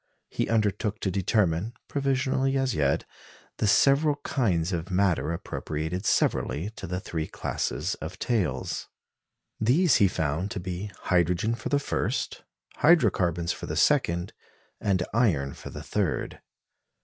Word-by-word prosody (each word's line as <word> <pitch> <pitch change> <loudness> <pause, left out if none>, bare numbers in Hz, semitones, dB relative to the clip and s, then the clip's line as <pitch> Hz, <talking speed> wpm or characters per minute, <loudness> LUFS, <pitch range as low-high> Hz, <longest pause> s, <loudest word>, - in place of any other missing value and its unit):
He - - -1
undertook 105 -1 0
to 95 - 0
determine 95 +1 +1
(provisionally 135 -1 +1
as 135 -3 +1
yet) 70 -4 +1 0.5
the 110 - +1
several 140 +7 +4
kinds 95 - 0
of 85 +1 -3
matter 90 -4 +1
appropriated 85 +2 -3
severally 85 +9 +1
to 110 - -8
the 90 +1 -2
three 80 -5 -4
classes 80 +6 -2
of 80 +4 -6
tails. 90 - -1 0.7
These 135 +7 +4
he 100 - +5
found 80 +2 -1
to 100 - -4
be 90 +3 -4
hydrogen 90 +4 +2
for 115 - -4
the 145 - +3
first, 140 - -2 0.3
hydro 150 - +5
carbons 85 -2 0
for - - -6
the - - -3
second, 85 +2 +2 0.5
and 95 -3 +1
iron 85 - +2
for - - -9
the - - -8
third. - - -2
95 Hz, 135 wpm, -27 LUFS, 85-115 Hz, 0.7 s, he